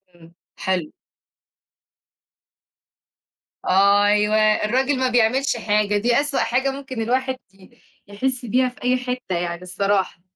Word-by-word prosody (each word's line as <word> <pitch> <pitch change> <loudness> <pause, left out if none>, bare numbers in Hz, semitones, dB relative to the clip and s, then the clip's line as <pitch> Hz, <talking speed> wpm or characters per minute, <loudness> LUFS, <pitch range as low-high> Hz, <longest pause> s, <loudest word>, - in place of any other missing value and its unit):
إمم، 165 -1 -18 0.3
حلو. 180 -5 -2 2.7
أيوة، 205 +2 +3 0.3
الراجل 260 +5 0
ما 260 0 +1
بيعملش 245 +2 +1
حاجة، 210 -2 +1
دي 235 +4 +2
أسوأ 290 -1 -1
حاجة 255 +4 0
ممكن 265 -3 -6
الواحد 260 +3 -1 0.2
ي 190 -1 -21 0.3
يحِس 250 +5 -3
بيها 255 +3 +1
في 250 - -17
أي 250 +1 +2
حتّة 250 -6 -4
يعني 170 0 -3
الصراحة. 190 0 -1
225 Hz, 115 wpm, -21 LUFS, 200-255 Hz, 2.7 s, أيوة